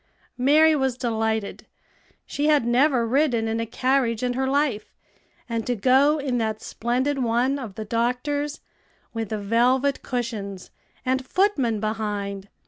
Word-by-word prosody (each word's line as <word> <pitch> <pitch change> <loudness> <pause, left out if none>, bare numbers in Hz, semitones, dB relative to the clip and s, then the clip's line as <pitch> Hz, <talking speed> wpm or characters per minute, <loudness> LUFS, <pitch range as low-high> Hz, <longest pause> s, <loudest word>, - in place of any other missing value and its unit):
Mary 305 +5 +5
was 265 -3 0
delighted. 220 -4 -2 0.6
She 290 +1 -2
had 295 -6 +3
never 250 0 +3
ridden 245 -2 +1
in 225 +1 -1
a 230 - -2
carriage 250 -1 0
in 250 0 0
her 265 +1 -1
life; 270 -6 -1 0.5
and 230 -2 -2
to 245 - 0
go 265 +7 +4
in 265 -4 -1
that 220 -1 -2
splendid 255 +5 -1
one 245 +4 +1
of 225 -7 -7
the 220 - -5
doctor's, 250 +6 -1 0.5
with 225 -3 -4
velvet 240 +6 +1
cushions, 215 -6 -5 0.3
and 260 +1 0
footmen 265 - +1
behind! 205 -2 -3
245 Hz, 135 wpm, -24 LUFS, 225-270 Hz, 0.6 s, Mary